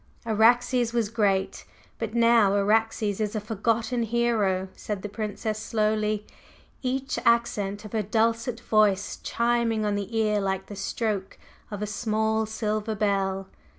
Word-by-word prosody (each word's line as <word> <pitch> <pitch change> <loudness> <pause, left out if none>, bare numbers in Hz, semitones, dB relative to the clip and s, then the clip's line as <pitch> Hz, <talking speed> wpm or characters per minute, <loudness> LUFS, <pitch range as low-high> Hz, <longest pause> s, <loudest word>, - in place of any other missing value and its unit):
"Araxes 235 +2 +3
was 230 -3 +1
great, 200 -4 0 0.4
but 225 0 -4
now 230 -4 +5
Araxes 215 0 +1
is 210 +1 -1
a - - 0
forgotten 225 +3 -1
hero," 220 -5 +1
said 205 -3 -5
the 205 - -4
Princess 215 +1 -3
slowly, 215 -1 0 0.6
each 265 +2 -2
accent 215 -3 +1
of 210 - -9
her 220 - +1
dulcet 230 +3 0
voice 210 -3 +2
chiming 235 -2 +1
on 205 - +1
the 205 +3 -3
ear 210 -1 +2
like 190 -1 -1
the 205 - -9
stroke 200 -1 -3 0.3
of 205 0 -5
a - - 0
small 220 +1 0
silver 215 0 -2
bell. 195 -2 0
215 Hz, 140 wpm, -26 LUFS, 205-230 Hz, 0.6 s, now